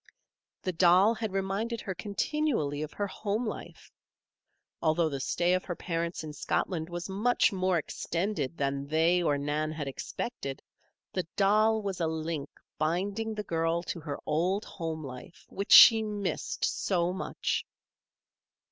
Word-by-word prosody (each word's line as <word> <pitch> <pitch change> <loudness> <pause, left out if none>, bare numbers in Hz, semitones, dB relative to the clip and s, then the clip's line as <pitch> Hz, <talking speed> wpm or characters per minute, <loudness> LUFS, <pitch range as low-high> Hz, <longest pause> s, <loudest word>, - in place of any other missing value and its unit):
The 185 - 0
doll 180 +5 +5
had 220 -2 -3
reminded 195 +5 -2
her 190 - -4
continually 205 - -1
of 155 0 -4
her 205 - -2
home 210 +3 -2
life. 215 - -7 0.9
Although 160 0 +2
the 140 -2 -4
stay 175 +6 +1
of 185 - +1
her 175 - -3
parents 170 -1 -3
in 155 -1 -6
Scotland 160 +1 -2
was 175 0 -5
much 210 +3 +2
more 185 -1 +1
extended 165 -1 -2
than 140 0 -1
they 165 +4 +3
or 150 -4 +2
Nan 150 +2 -1
had 155 -2 -4
expected, 135 - -5 0.5
the 185 -3 -2
doll 215 +2 +3
was 195 -2 -3
a 165 - +2
link 160 -2 -3 0.3
binding 200 +8 -1
the 210 - -3
girl 165 -1 0
to 175 - -4
her 145 -3 -5
old 180 +7 0
home 160 -3 -5
life 130 +5 -10
which 200 +2 -5
she 225 -2 +10
missed 210 -2 -2
so 180 -2 0
much. 190 - -2
175 Hz, 145 wpm, -29 LUFS, 155-200 Hz, 0.9 s, she